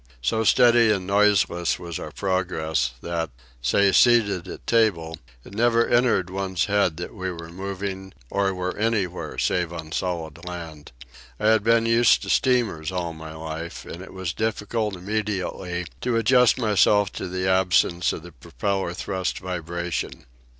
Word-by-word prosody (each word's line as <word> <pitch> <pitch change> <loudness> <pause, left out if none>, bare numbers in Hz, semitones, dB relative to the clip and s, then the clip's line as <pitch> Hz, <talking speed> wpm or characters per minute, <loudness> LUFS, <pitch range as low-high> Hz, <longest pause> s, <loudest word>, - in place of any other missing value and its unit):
So 110 - +1
steady 120 0 +5
and 95 -3 -1
noiseless 100 -3 +2
was 85 -2 -6
our - - -6
progress, 85 -8 -1
that, 85 -2 -2 0.3
say 100 +11 +3
seated 105 -6 +4
at - - -9
table, 85 - +1 0.3
it - - -12
never 115 +2 +3
entered 115 -7 +2
one's 95 -2 -1
head 100 -6 +1
that 85 - -6
we 95 -3 -4
were 85 -1 -9
moving 95 +1 -5 0.2
or 100 -1 +1
were 90 0 -3
anywhere 105 -5 -1
save 90 -2 0
on 80 -2 -7
the - - -3
solid 85 -3 -3
land. 85 -4 -8 0.5
I 105 0 +3
had 110 -2 +4
been 115 +1 +3
used 115 0 +4
to - - -2
steamers 115 - +1
all 90 -2 -3
my 80 0 -9
life, 80 +1 -6
and 85 - -8
it 95 - -10
was 95 -2 -4
difficult 110 -1 -2
immediately 95 -2 -3 0.2
to 120 -2 0
adjust 125 +2 +4
myself 105 -3 +3
to - - -5
the 95 +1 -2
absence 90 -2 +2
of 80 - -6
the 85 - -11
propeller 95 +6 -3
thrust 95 0 -3
vibration. 85 -1 -4
95 Hz, 155 wpm, -24 LUFS, 85-105 Hz, 0.5 s, steady